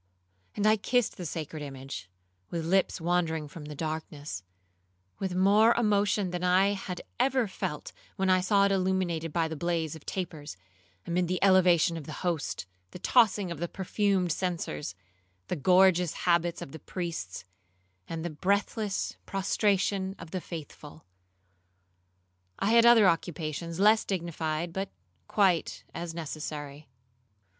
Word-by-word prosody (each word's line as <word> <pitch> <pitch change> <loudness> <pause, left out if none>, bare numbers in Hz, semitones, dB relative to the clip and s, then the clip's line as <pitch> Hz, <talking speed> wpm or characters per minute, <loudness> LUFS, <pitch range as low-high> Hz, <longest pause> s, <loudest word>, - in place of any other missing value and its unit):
'—and 205 - -1
I 215 +1 +5
kissed 245 +2 0
the 180 - -4
sacred 155 0 -5
image 135 -9 -7 0.4
(with 165 -2 -3
lips 190 +2 +2
wandering 165 -2 0
from 150 +1 -10
the 150 0 -7
darkness) 155 - -5 0.8
with 190 -2 -2
more 205 +5 +5
emotion 205 -4 +2
than 180 0 -3
I 185 +2 +4
had 195 -3 -4 0.2
ever 260 -2 +2
felt 150 -5 -5 0.2
when 190 -1 0
I 185 0 +4
saw 200 +2 +4
it 200 - +2
illuminated 185 -4 0
by 165 +1 +1
the 160 - -5
blaze 165 -1 -1
of 160 - -12
tapers, 155 - -5 0.5
amid 175 +1 0
the 180 +1 0
elevation 180 -3 +5
of 155 - -7
the 155 +4 -7
Host, 165 - -1 0.2
the - - -9
tossing 205 -2 +3
of 165 - -5
the 175 - -1
perfumed 190 -1 0
censers, 155 - -3 0.5
the - - 0
gorgeous 180 +1 +4
habits 170 -1 +2
of - - -10
the 160 - -9
priests, 165 - -5 0.6
and 165 0 -4
the 175 - -2
breathless 200 +5 -1
prostration 195 0 +1
of 165 -1 -11
the 185 - -3
faithful. 155 -2 -9 1.5
I 200 - +1
had 235 0 +7
other 230 -4 +7
occupations 165 0 -2
less 215 +2 +5
dignified, 170 -2 -3
but 195 +1 -3 0.4
quite 190 -5 +1
as 170 0 -5
necessary. 150 -3 -6
175 Hz, 140 wpm, -29 LUFS, 160-195 Hz, 1.5 s, had